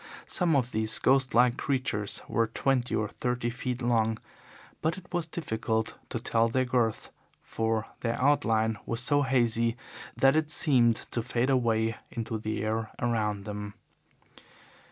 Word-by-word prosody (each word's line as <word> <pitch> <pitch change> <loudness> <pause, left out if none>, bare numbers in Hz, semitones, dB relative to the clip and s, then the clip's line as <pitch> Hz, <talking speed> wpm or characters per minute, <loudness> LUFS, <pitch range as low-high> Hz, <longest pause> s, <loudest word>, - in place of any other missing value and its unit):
Some 170 -4 +1
of 130 -2 +1
these 110 0 +2
ghost 130 -1 +2
like 125 +1 +4
creatures 130 -8 -1
were 115 -1 +1
twenty 125 +2 0
or 105 - 0
thirty 125 -1 -2
feet 125 0 -4
long, 115 -2 +2 0.6
but 160 +3 0
it 185 - -11
was 175 -2 -1
difficult 110 -8 -2
to 120 - -3
tell 115 0 +2
their 130 +2 +1
girth, 120 -3 0 0.3
for 110 -1 -1
their 115 -1 -2
outline 115 -6 +2
was 115 - -1
so 145 +3 +2
hazy 120 -3 +1 0.4
that 135 +2 +5
it 155 -1 +1
seemed 125 -8 +4 0.2
to 120 - 0
fade 120 +3 0
away 115 -3 +1
into 115 -1 -4
the 110 0 -3
air 110 0 -1
around 105 -4 -1
them. 105 -1 -6
120 Hz, 150 wpm, -28 LUFS, 110-130 Hz, 0.6 s, that